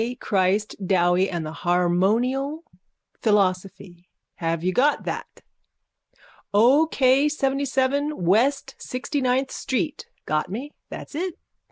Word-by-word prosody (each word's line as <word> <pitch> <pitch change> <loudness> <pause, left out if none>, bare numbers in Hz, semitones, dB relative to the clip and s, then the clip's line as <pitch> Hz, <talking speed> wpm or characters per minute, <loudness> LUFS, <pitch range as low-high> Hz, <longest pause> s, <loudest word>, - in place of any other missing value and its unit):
Christ 195 +1 0
Dowie 180 0 +2
and 170 -3 -3
the 155 - -5
harmonial 215 - 0 0.6
philosophy, 190 -3 -1 0.3
have 165 -2 -2
you 185 +1 0
got 285 +7 +2
that? - - -6 1.1
O. 265 +9 +5
K. 270 0 +3
Seventyseven 280 0 0
west 250 +10 +1
sixtyninth 260 0 -1
street. 280 +3 -3 0.2
Got 155 +3 -1
me? 250 +10 -6 0.2
That's - - -9
it. 350 +3 -3
235 Hz, 100 wpm, -23 LUFS, 185-275 Hz, 1.1 s, O